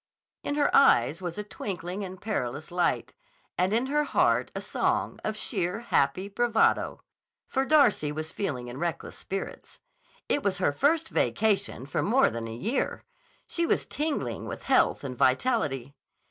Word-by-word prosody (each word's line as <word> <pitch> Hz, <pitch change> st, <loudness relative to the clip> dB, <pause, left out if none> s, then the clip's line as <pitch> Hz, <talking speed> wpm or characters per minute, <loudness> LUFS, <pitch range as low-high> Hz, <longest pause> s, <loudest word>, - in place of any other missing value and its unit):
In 285 Hz, -, -2 dB
her 290 Hz, -1 st, +2 dB
eyes 150 Hz, -, +5 dB
was 175 Hz, -1 st, -4 dB
a 210 Hz, -, -2 dB
twinkling 185 Hz, -2 st, -5 dB
and 185 Hz, -1 st, -7 dB
perilous 155 Hz, -, -3 dB
light, 175 Hz, 0 st, 0 dB, 0.4 s
and 185 Hz, +2 st, +1 dB
in 230 Hz, +4 st, +2 dB
her 295 Hz, +2 st, +1 dB
heart -, -, +2 dB
a -, -, -2 dB
song -, -, -1 dB
of 215 Hz, 0 st, -2 dB
sheer, 200 Hz, -1 st, -2 dB
happy 185 Hz, -4 st, +1 dB
bravado. 225 Hz, +2 st, +1 dB, 0.4 s
For 265 Hz, 0 st, 0 dB
Darcy 255 Hz, -, +4 dB
was 155 Hz, +1 st, -5 dB
feeling 135 Hz, -11 st, -3 dB
in 125 Hz, +2 st, -7 dB
reckless 170 Hz, -1 st, -3 dB
spirits. 195 Hz, 0 st, -6 dB, 0.5 s
It 290 Hz, -, +1 dB
was 195 Hz, -5 st, 0 dB
her 180 Hz, -5 st, +2 dB
first 315 Hz, -, +1 dB
vacation 205 Hz, -, +1 dB
for 140 Hz, -, -1 dB
more 260 Hz, +6 st, +3 dB
than 115 Hz, 0 st, -4 dB
a 115 Hz, -, -6 dB
year. 220 Hz, -, -2 dB, 0.4 s
She 335 Hz, -1 st, -1 dB
was -, -, +1 dB
tingling 300 Hz, 0 st, -3 dB
with -, -, -6 dB
health -, -, +3 dB
and 130 Hz, -2 st, -5 dB
vitality. 135 Hz, -, +1 dB
195 Hz, 160 wpm, -28 LUFS, 150-240 Hz, 0.5 s, eyes